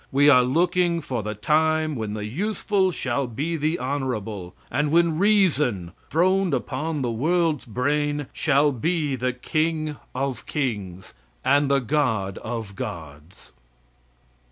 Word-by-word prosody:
We 145 Hz, +2 st, +5 dB
are 125 Hz, -2 st, +7 dB
looking 170 Hz, +6 st, +2 dB
for 130 Hz, -7 st, -3 dB
the 105 Hz, +1 st, -4 dB
time 155 Hz, +5 st, +2 dB
when 110 Hz, -3 st, -3 dB
the 105 Hz, -1 st, -4 dB
useful 195 Hz, -, 0 dB
shall 130 Hz, -4 st, -2 dB
be 145 Hz, +9 st, -3 dB
the 155 Hz, +2 st, 0 dB
honorable; 110 Hz, -8 st, -3 dB, 0.2 s
and 145 Hz, +4 st, +1 dB
when 165 Hz, 0 st, +3 dB
REASON, 150 Hz, -, +2 dB, 0.2 s
throned 185 Hz, 0 st, +2 dB
upon 150 Hz, +3 st, -3 dB
the 120 Hz, -, 0 dB
world's 160 Hz, +4 st, +1 dB
brain, 145 Hz, +5 st, 0 dB
shall 145 Hz, -1 st, +3 dB
be 150 Hz, +2 st, -1 dB
the 125 Hz, 0 st, -1 dB
King 155 Hz, +3 st, -1 dB, 0.2 s
of 130 Hz, -3 st, -3 dB
Kings, 100 Hz, -10 st, -3 dB, 0.3 s
and 140 Hz, 0 st, +3 dB
God 110 Hz, -9 st, 0 dB
of 110 Hz, -3 st, -5 dB
Gods. 80 Hz, -2 st, -8 dB
145 Hz, 130 wpm, -24 LUFS, 115-160 Hz, 0.3 s, are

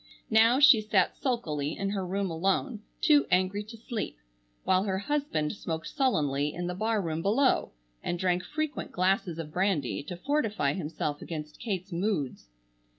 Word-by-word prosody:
Now 225 Hz, +4 st, +6 dB
she 285 Hz, -6 st, +8 dB
sat 210 Hz, -4 st, +2 dB
sulkily 160 Hz, -, -2 dB
in 195 Hz, 0 st, -1 dB
her 195 Hz, -2 st, -2 dB
room 190 Hz, 0 st, -2 dB
alone, 195 Hz, -, 0 dB, 0.2 s
too 295 Hz, -2 st, +5 dB
angry 185 Hz, +3 st, +2 dB
to 230 Hz, +2 st, -10 dB
sleep; 220 Hz, -, -4 dB, 0.5 s
while 185 Hz, 0 st, +3 dB
her 190 Hz, -2 st, 0 dB
husband 200 Hz, -, -1 dB
smoked 165 Hz, -5 st, -4 dB
sullenly 150 Hz, -, +1 dB
in 175 Hz, -, -3 dB
the 180 Hz, -, -2 dB
barroom 190 Hz, -6 st, -1 dB
below, 235 Hz, -, +2 dB, 0.3 s
and 175 Hz, -, -1 dB
drank 180 Hz, 0 st, +1 dB
frequent 310 Hz, 0 st, -3 dB
glasses 185 Hz, -2 st, +1 dB
of 155 Hz, -2 st, -6 dB
brandy 185 Hz, -8 st, 0 dB
to 175 Hz, +3 st, -6 dB
fortify 220 Hz, -, 0 dB
himself 150 Hz, -3 st, -3 dB
against 155 Hz, -2 st, -7 dB
Kate's 195 Hz, -4 st, -3 dB
moods. 170 Hz, -, -2 dB
190 Hz, 150 wpm, -29 LUFS, 165-220 Hz, 0.5 s, she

